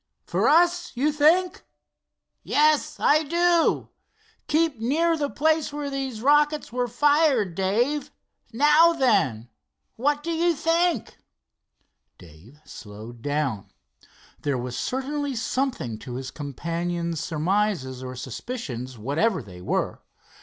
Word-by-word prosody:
"For - - +1
us, 350 +2 +3
you 285 +5 +1
think?" 335 +5 +3 0.8
"Yes, 300 0 +2
I 305 +2 +4
do. 340 +2 +2 0.6
Keep 315 -5 +1
near 320 +9 +1
the 290 -3 -2
place 315 +1 +1
where 290 -1 -4
these 265 -5 -4
rockets 295 -1 +2
were 250 0 0
fired, 280 - +2
Dave. 240 - 0 0.4
Now 300 +7 +5
then, 195 - +1 0.5
what 290 +4 0
do 335 - -3
you 335 +1 +1
think?" 330 - 0 1.0
Dave 90 - -17
slowed 110 +2 -11
down. 145 -6 -2 0.7
There 140 -3 -1
was 125 0 -5
certainly 280 +1 -3
something 245 - -2
to 120 +3 -8
his 130 0 -6
companion's 170 +3 -3
surmises 165 -5 -1
or 130 0 -7
suspicions, 130 - -6
whatever 155 - 0
they 90 -3 -12
were. - - -2
245 Hz, 115 wpm, -24 LUFS, -, 1.0 s, Now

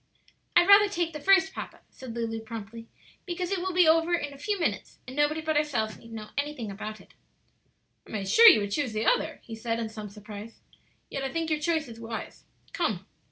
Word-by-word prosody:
"I'd 350 +1 +6
rather 405 +1 +8
take 345 -4 -1
the 300 - -5
first, 385 +3 +4
papa," - - -8
said 250 -3 -9
Lulu, 225 -1 -2
promptly, 225 0 -8 0.4
"because 360 +1 -3
it 390 - 0
will 375 +1 -2
be 355 -2 +4
over 330 +2 +4
in 290 -4 -4
a - - -12
few 410 +6 -2
minutes, 335 - -2
and 255 - -9
nobody 295 +2 +1
but 315 0 -1
ourselves 245 -8 0
need 230 - -14
know 215 -1 -7
anything 285 -7 -4
about 215 +2 -7
it." - - -19 0.9
"I - - -13
made 200 -3 -3
sure 460 - +9
you 215 - +5
would 205 0 -3
choose 255 0 -1
the 215 +1 -1
other," - - +1
he 225 - -10
said, 230 +1 -2
in 225 -1 -3
some 215 -1 -8
surprise; 210 +2 -10 0.5
"yet 275 - -3
I 270 - -2
think 325 0 -2
your 305 - +1
choice 315 -1 0
is 230 -1 -10
wise. 225 -1 -7 0.3
Come!" 210 - -1
265 Hz, 215 wpm, -28 LUFS, 220-330 Hz, 0.9 s, sure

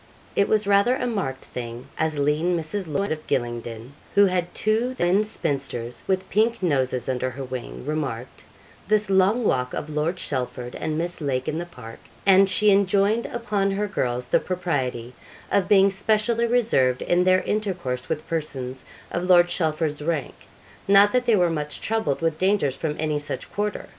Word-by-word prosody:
It 200 - +2
was 215 -1 +2
rather 200 +5 +4
a 255 - -2
marked 190 - -3
thing 120 0 -7
as 155 -1 -1
lean 150 +5 +1
Mrs. 165 +4 -3
Loyd, 195 +5 -1
of 155 -1 -4
Gylingden, 120 0 -3 0.2
who 200 0 +7
had 180 -2 0
two 225 +4 0
thin 185 0 +2
spinsters 135 - -3
with 190 0 0
pink 220 0 +1
noses 130 -6 0
under 130 0 -1
her 135 +2 -7
wing, 130 -1 -7
remarked 135 -5 -4 0.4
this 210 -1 +2
long 195 +6 +3
walk 125 - 0
of 155 - -5
Lord 155 +4 0
Chelford 125 -6 -4
and 155 -1 -3
Miss 175 +1 -2
Lake 130 -3 -1
in 155 - -1
the 175 - -5
park; 115 -8 -11 0.3
and 195 0 +6
she 205 +3 +3
enjoined 200 +3 +2
upon 210 -5 -1
her 200 +2 -1
girls 125 -9 -2
the - - +4
propriety 130 -10 -3 0.4
of 195 -2 +2
being 195 -1 +5
specially 220 +4 +1
reserved 210 - +2
in 175 +1 +2
their 185 0 +3
intercourse 180 -12 -2
with 155 -1 -3
persons 135 -5 -4 0.3
of 175 +1 -2
Lord 175 -1 +6
Chelford's 155 -3 -1
rank; 155 -2 -2 0.5
not 200 +1 +6
that 250 +1 +1
they 235 -2 +4
were 175 -3 +3
much 150 -2 -3
troubled 220 -12 -1
with 160 -1 0
dangers 185 -8 +2
from 150 0 -3
any 155 -1 -1
such 145 - -6
quarter. 210 0 -2
170 Hz, 175 wpm, -24 LUFS, 135-200 Hz, 0.5 s, who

